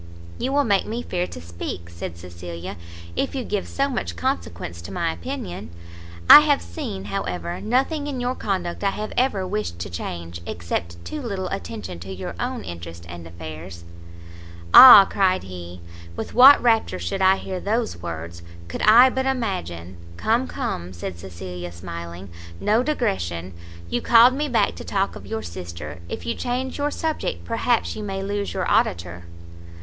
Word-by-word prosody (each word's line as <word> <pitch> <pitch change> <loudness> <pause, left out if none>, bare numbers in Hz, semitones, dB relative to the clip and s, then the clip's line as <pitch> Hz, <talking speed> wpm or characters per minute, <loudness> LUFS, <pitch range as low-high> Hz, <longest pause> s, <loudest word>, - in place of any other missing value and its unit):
"You 260 - -1
will 285 +1 +3
make 200 -6 +2
me 235 +3 -3
fear 180 0 -2
to - - -9
speak," 85 +1 -7
said 85 0 -7
Cecilia, 85 0 -8 0.4
"if - - -1
you 260 - -2
give 205 -4 -2
so 275 0 0
much 90 - -3
consequence 85 0 -3
to 85 - -9
my - - -1
opinion. 85 0 -6 0.6
I - - +13
have 80 - +2
seen, 90 +3 -6
however, 90 -3 -4
nothing 270 +6 0
in 275 -3 -3
your 245 +1 -1
conduct 185 -6 -3
I 200 - +3
have 210 +2 -5
ever 225 -7 +1
wished 195 - -3
changed, 85 0 -6
except 85 0 -4
too 305 - -5
little 200 -7 -3
attention 85 -1 -6
to 95 +3 -8
your 90 -2 -6
own - - -3
interest 85 0 -8
and 85 -1 -9
affairs." 85 +1 -9 0.9
"Ah!" 225 -6 +12
cried 185 -2 +1
he, 90 -1 -9 0.3
"with - - -6
what 265 +4 +9
rapture 225 - +2
should 90 - -3
I 190 0 +6
hear 190 -1 -5
those 225 +4 -1
words, 85 0 -6 0.3
could 85 - -5
I 240 +5 +7
but 265 +1 -1
imagine 90 - -3
" 85 0 -16
"Come, 235 - +1
come," 95 - -4
said 85 0 -6
Cecilia, 90 -1 -7
smiling, 85 +1 -8 0.3
"no 215 +3 +2
digression! 90 - -2 0.3
You 120 - -1
called 235 +2 +7
me 295 +2 -2
back 240 - +2
to - - -7
talk 195 0 -1
of 95 - -10
your 110 +1 -4
sister; 85 -3 -7
if 85 - -6
you 80 - 0
change 255 +3 -3
your 290 +1 +1
subject, 315 +1 -3
perhaps 230 0 0
you 215 - -6
may 195 -2 -4
lose 200 +1 -2
your - - -1
auditor." 85 0 0
95 Hz, 170 wpm, -23 LUFS, -, 0.9 s, I